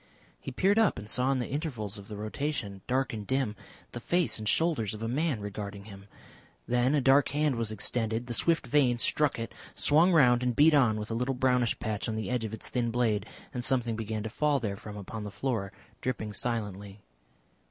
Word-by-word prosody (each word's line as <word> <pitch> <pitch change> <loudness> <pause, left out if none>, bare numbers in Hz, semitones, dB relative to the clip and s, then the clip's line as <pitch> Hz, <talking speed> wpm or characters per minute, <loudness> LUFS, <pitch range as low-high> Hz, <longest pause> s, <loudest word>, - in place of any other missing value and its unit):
He - - -6
peered 195 - +2
up 220 -4 +3
and 105 +1 -7
saw 125 +4 +2
in 135 - +1
the 125 - -2
intervals 120 - -4
of 100 - -12
the 105 - -7
rotation, 105 -2 -3
dark 130 0 0
and 105 -2 -6
dim, 130 -5 0 0.4
the 120 - -6
face 175 +2 +1
and 110 -1 -2
shoulders 150 - +1
of 110 - -7
a - - -1
man 140 +1 0
regarding 100 -1 -6
him. 100 -2 -12 0.6
Then 125 +4 +2
a 145 - +2
dark 135 +2 +5
hand 150 -1 +1
was 115 -2 -2
extended, 110 +2 -1
the 120 - -4
swift 165 +6 +2
vane 130 -2 +3
struck 145 +5 +2
it, 115 0 -5 0.2
swung 160 +5 +5
round 125 -7 +5
and 125 -1 0
beat 155 +4 +6
on 125 -7 +4
with 105 +1 -5
a - - -1
little 125 +3 -1
brownish 125 -2 +2
patch 110 +1 -3
on 110 - -2
the 110 0 -3
edge 125 -3 0
of 110 - -5
its 110 - -9
thin 120 -2 -1
blade, 115 -3 0 0.3
and 125 - -3
something 120 -3 +1
began 110 -1 -3
to 110 - -4
fall 145 +4 +1
therefrom 105 -2 -5
upon 105 +2 -6
the 105 - -5
floor, 105 -3 -2 0.3
dripping 110 -4 -3
silently. 105 -3 -3
120 Hz, 210 wpm, -29 LUFS, 105-135 Hz, 0.6 s, beat